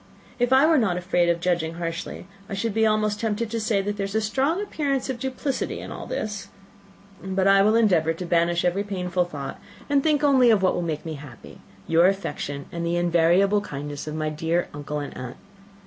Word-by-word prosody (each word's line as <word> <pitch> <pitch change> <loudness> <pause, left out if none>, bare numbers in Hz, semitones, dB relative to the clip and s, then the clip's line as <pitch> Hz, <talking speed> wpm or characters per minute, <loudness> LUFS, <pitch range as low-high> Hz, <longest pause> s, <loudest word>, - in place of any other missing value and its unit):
If 245 +1 +1
I 265 +3 +6
were 320 -2 +4
not 190 -7 +1
afraid 175 -1 +1
of 170 0 +1
judging 170 -2 0
harshly, 165 +1 -5 0.2
I 200 - -3
should 215 +2 -2
be 220 +1 +3
almost 215 -1 +1
tempted 225 0 -2
to 230 - -1
say, 210 -2 +1
that 205 +1 -3
there 200 - -1
is 200 +2 -6
a - - +4
strong 270 - 0
appearance 280 -10 -1
of 245 - -6
duplicity 265 +1 -3
in - - -8
all - - -7
this. 210 - -4 0.8
I 195 +1 +3
will 215 +3 +4
endeavour 180 -8 +3
to 180 +2 -6
banish 170 0 +2
every 180 +3 +1
painful 180 -3 -1
thought, 145 -5 -7 0.3
and 280 -1 +4
think 300 0 +1
only 265 -4 +5
of 210 -4 +4
what 185 - +3
will - - -1
make 160 -3 -3
me 160 - -4
happy, 130 -5 -13 0.2
your 165 +2 +4
affection, 145 -7 -3
and 170 0 -4
the 170 +1 0
invariable 175 +4 +3
kindness 145 -3 -6
of 155 - -4
my 155 0 -1
dear 160 +3 -1
uncle 145 +1 -5
and 145 - -6
aunt. 125 -1 -7
190 Hz, 210 wpm, -24 LUFS, 170-220 Hz, 0.8 s, I